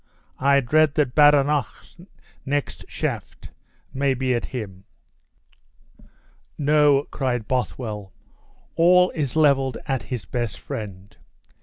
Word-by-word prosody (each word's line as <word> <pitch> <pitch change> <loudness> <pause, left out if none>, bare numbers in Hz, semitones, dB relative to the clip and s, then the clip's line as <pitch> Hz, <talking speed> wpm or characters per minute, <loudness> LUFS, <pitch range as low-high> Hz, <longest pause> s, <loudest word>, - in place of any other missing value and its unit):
I 140 +1 +4
dread 155 +4 +2
that 140 -5 +1
Badenoch's 145 -1 +2 0.5
next 145 +1 -3
shaft - - -5 0.4
may 135 0 0
be 130 0 0
at 120 - -2
him!" 100 -7 -7 1.7
"No," 145 -1 +3
cried 125 -5 -2
Bothwell, 110 -6 -3 0.6
"all 180 +2 +5
is 145 -5 -3
leveled 135 -5 +2
at 135 -3 -1
his 120 -7 -6
best 115 0 -3
friend. 100 0 -8
135 Hz, 105 wpm, -23 LUFS, 120-145 Hz, 1.7 s, all